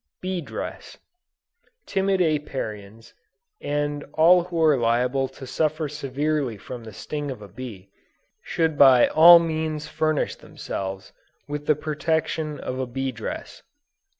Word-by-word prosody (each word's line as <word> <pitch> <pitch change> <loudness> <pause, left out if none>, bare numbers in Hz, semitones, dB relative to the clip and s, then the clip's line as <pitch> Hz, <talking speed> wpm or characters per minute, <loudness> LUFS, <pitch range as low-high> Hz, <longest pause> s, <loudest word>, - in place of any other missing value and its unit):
BEE 185 -1 -3
DRESS. 145 - -7 0.9
Timid 195 -1 +1
Apiarians, 115 - -3 0.5
and 145 0 -2
all 175 +2 +5
who 175 -2 -4
are 155 -2 +5
liable 125 +2 +1
to 130 - -11
suffer 155 +4 -1
severely 140 -3 -2
from 120 +4 -9
the 110 - -9
sting 145 +8 -5
of 125 -6 -7
a - - -10
bee, 100 -4 -10 0.5
should 160 -2 -1
by 130 -3 +8
all 170 +2 +9
means 160 -2 -2
furnish 155 -1 -1
themselves 95 0 -6 0.3
with 145 0 -5
the 155 - +4
protection 155 0 -2
of 130 - -5
a 130 - -2
bee 135 +2 -3
dress. 115 -3 -7
145 Hz, 130 wpm, -24 LUFS, 125-155 Hz, 0.9 s, all